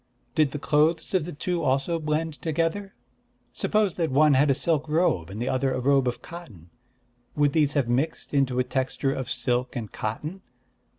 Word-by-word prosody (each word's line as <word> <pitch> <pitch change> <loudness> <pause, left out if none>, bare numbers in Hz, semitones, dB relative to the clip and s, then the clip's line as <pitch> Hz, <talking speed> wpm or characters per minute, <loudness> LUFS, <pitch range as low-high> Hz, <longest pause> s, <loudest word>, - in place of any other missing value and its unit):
Did 155 -2 +3
the 145 - -5
clothes 155 +4 +1
of 180 -5 +2
the 175 - -6
two 175 +3 -2
also 140 +4 0
blend 155 0 -2
together? 165 +5 -2 0.6
Suppose 210 -4 +1
that 165 -2 0
one 150 +2 +4
had 140 +2 +4
a 135 - +4
silk 155 +1 +1
robe 150 - +1
and 100 +3 -7
the 120 - -2
other 130 0 0
a - - -2
robe 135 0 +3
of 125 - -3
cotton, 110 - -11 0.6
would 145 -1 +2
these 150 -3 +3
have 140 -5 +1
mixed 135 +8 -1
into 135 -3 +1
a 125 - +3
texture 130 +1 -1
of 130 -3 -4
silk 125 +1 -1
and 115 -4 -5
cotton? 150 - -5
145 Hz, 185 wpm, -26 LUFS, 130-160 Hz, 0.6 s, one